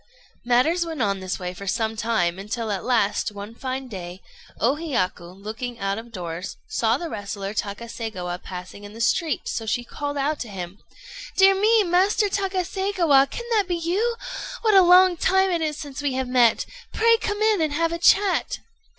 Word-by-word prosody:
Matters 255 +9 +3
went 325 -3 -6
on 200 -4 +1
in - - -10
this 185 0 -3
way 180 -1 -5
for 200 +2 -9
some 220 +3 0
time, 200 -6 0
until 220 +2 -3
at 195 - -2
last, 225 -5 +1
one 205 +2 -8
fine 260 +2 -4
day, 180 -5 -7 0.4
O 245 +4 +3
Hiyaku, 185 - -2
looking 220 +5 -6
out 195 0 -2
of 235 +1 -11
doors, 175 -2 -6
saw 230 +1 +1
the 340 - -5
wrestler 200 -4 -5
Takaségawa 205 -4 -4
passing 185 +2 -9
in 205 0 -10
the 225 - -11
street, 300 +5 0
so 225 - -3
she 240 +2 0
called 290 +4 -5
out 290 +2 0
to 235 - -5
him 190 0 -7 0.6
"Dear 390 0 +7
me, 430 +3 +4
Master 385 +4 +2
Takaségawa, 375 -6 +2
can 475 - -6
that 420 -4 +2
be 355 - 0
you! 390 +8 0 0.5
What 435 -2 +4
a 385 - +8
long 360 0 +6
time 380 +2 +3
it 340 -2 0
is 305 -2 -1
since 285 -2 -7
we 285 -2 -1
have 260 0 -2
met! 245 -2 +3 0.3
Pray 460 +1 +4
come 420 -1 -2
in, 430 -5 +3
and 310 -2 +1
have 330 +2 +1
a 335 - -3
chat." 390 +2 +3
255 Hz, 190 wpm, -24 LUFS, -, 0.6 s, a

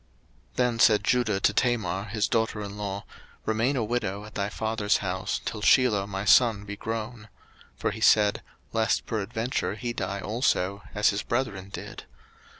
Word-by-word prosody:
01:038:011 - - -31
Then 125 -2 +1
said 105 -3 +5
Judah 110 -4 +2
to - - +2
Tamar 105 -7 0
his 110 -1 -1
daughter 110 -1 0
in 100 0 -7
law, 100 -1 -4 0.4
Remain 115 +5 +1
a 120 - 0
widow 105 -3 -2
at 105 - -12
thy 100 0 -2
father's 110 -1 0
house, 95 -1 -2
till 105 - -4
Shelah 105 -5 +4
my 95 0 -4
son 110 -1 +5
be 105 0 -6
grown: 110 +1 -5 0.5
for - - -1
he - - -8
said, 105 -1 +4 0.3
Lest 110 -2 +1
peradventure 110 +3 -2
he 120 -1 -4
die 100 -3 -3
also, 100 -3 0
as 105 +1 +4
his 100 - -1
brethren 110 -6 -2
did. - - -8
105 Hz, 165 wpm, -27 LUFS, 100-115 Hz, 0.5 s, said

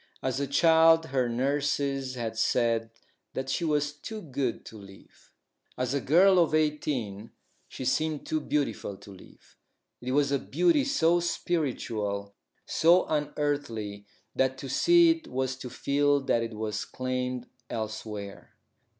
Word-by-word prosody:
As 130 0 -1
a 140 - -1
child 165 +2 +5
her 130 -4 0
nurses 135 +1 -1
had 115 -2 -4
said 115 -1 +1 0.5
that 130 0 -3
she 170 - -1
was 150 -2 0
too 215 +9 -7
good 135 - -3
to - - -11
live. 95 -1 -16 0.5
As 125 0 -1
a 140 - 0
girl 185 +7 +5
of 165 -2 +3
eighteen 135 -9 -1 0.4
she 130 - -7
seemed 155 +3 0
too 155 - -1
beautiful 135 -9 -2
to 100 - -13
live. 95 - -17 0.4
It 125 +1 -3
was 140 0 +2
a 140 - +2
beauty 320 - +2
so 175 - +3
spiritual, 115 -13 -2 0.3
so 175 +3 +4
unearthly, 140 -9 -2 0.3
that 130 0 +1
to 135 0 -7
see 345 - +5
it 330 -1 -3
was 130 0 -2
to 130 -1 -7
feel 145 +2 +1
that 125 -3 +1
it 115 -1 -4
was 110 0 -3
claimed 125 -1 -3 0.2
elsewhere. 105 -2 -6
135 Hz, 140 wpm, -28 LUFS, 115-155 Hz, 0.5 s, child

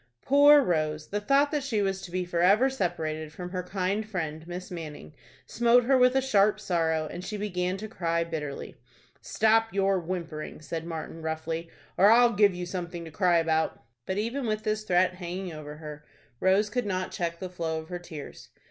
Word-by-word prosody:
Poor 285 +1 +7
Rose! 155 -4 -1
the 205 +1 -2
thought 275 +6 +3
that 300 -2 0
she 245 -6 -1
was 195 -1 0
to - - -8
be 180 +1 -2
forever 190 +9 +3
separated 160 -8 -3
from 180 +2 -7
her 185 -1 -2
kind 190 +3 -1
friend, 160 -4 -4
Miss 180 +1 -7
Manning, 155 -3 -8 0.3
smote 240 - +4
her 265 +3 +3
with 250 0 +5
a 265 - +3
sharp 210 -5 +3
sorrow, 165 -5 0
and 180 - -7
she 210 - -4
began 185 -2 -2
to 215 +2 -6
cry 170 -5 -1
bitterly. 155 -4 -5 0.5
"Stop 225 +1 +2
your 195 -1 +2
whimpering," 165 -3 -5
said 160 +2 -5
Martin, 165 0 -6
roughly, 160 +1 -3 0.3
"or 200 +3 +7
I'll 235 +1 +6
give 200 -2 +4
you 180 0 -4
something 175 -1 -5
to 160 - -9
cry 175 +1 +3
about." 160 -1 +1 0.3
But, 190 - -2
even 235 +5 -2
with 215 0 -1
this 215 0 -1
threat 180 -1 +3
hanging 180 0 -5
over 150 -1 -8
her, 150 -1 -9 0.4
Rose 200 +3 +3
could 245 -1 -1
not 185 -1 -2
check 170 -1 -3
the 185 - -5
flow 165 -3 -3
of 160 - -11
her 180 -1 -4
tears. 160 -4 -10
180 Hz, 190 wpm, -28 LUFS, 165-210 Hz, 0.5 s, Poor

